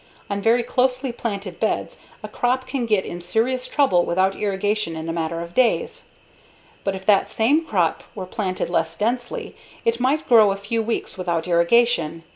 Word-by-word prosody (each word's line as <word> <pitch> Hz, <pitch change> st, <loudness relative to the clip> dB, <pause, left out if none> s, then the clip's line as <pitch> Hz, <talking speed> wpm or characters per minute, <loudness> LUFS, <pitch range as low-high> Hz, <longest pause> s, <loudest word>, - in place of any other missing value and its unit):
On 200 Hz, 0 st, -1 dB
very 235 Hz, +3 st, +3 dB
closely 255 Hz, +1 st, 0 dB
planted 200 Hz, -6 st, -5 dB
beds 220 Hz, -, -1 dB, 0.2 s
a -, -, -4 dB
crop 255 Hz, +1 st, -1 dB
can 255 Hz, -4 st, -3 dB
get 210 Hz, -4 st, +2 dB
in 175 Hz, -, -6 dB
serious 235 Hz, +8 st, 0 dB
trouble 195 Hz, -12 st, +3 dB
without 185 Hz, +3 st, +1 dB
irrigation 205 Hz, -2 st, -1 dB
in 160 Hz, 0 st, -5 dB
a 165 Hz, -, -2 dB
matter 165 Hz, 0 st, -2 dB
of 170 Hz, 0 st, -8 dB
days. 250 Hz, +1 st, +1 dB, 0.8 s
But 195 Hz, -1 st, -1 dB
if 190 Hz, 0 st, -9 dB
that 205 Hz, -2 st, +4 dB
same 280 Hz, +9 st, +2 dB
crop 180 Hz, -, 0 dB
were 190 Hz, -3 st, -5 dB
planted 185 Hz, -1 st, -3 dB
less 165 Hz, -1 st, -1 dB
densely, 240 Hz, +3 st, -2 dB, 0.3 s
it 230 Hz, +1 st, +1 dB
might 275 Hz, +5 st, +1 dB
grow 220 Hz, -4 st, +6 dB
a -, -, -1 dB
few 215 Hz, +3 st, -2 dB
weeks 225 Hz, -3 st, -3 dB
without 170 Hz, -2 st, -1 dB
irrigation. 170 Hz, -2 st, +2 dB
205 Hz, 175 wpm, -22 LUFS, 175-240 Hz, 0.8 s, grow